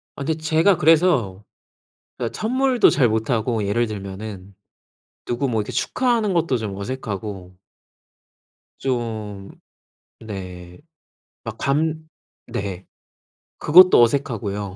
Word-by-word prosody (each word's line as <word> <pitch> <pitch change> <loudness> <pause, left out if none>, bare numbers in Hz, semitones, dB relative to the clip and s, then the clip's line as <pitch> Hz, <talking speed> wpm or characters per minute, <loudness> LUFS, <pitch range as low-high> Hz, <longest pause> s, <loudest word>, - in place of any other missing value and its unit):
아 140 - -6
근데 160 +3 -1
제가 160 +4 +3
그래서 155 - +3 0.8
예 - - -1
선물도 255 +1 +2
잘 130 - +3
못하고 110 0 -1
예를 115 +4 0
들면은 100 -1 -8 0.7
누구 120 +3 -1
뭐 115 -4 0
이렇게 105 - -6
축하하는 235 -6 0
것도 165 -6 +1
좀 105 -4 -5
어색하고 100 -4 -6 1.2
좀 110 -6 -4 0.7
네. 90 -4 -9 0.7
막 - - -7
감 155 +3 -1 0.4
네. 95 -2 -5 0.7
그것도 180 -1 +7
어색하고요. 105 -6 -1
115 Hz, 205 characters per minute, -21 LUFS, 100-155 Hz, 1.2 s, 그것도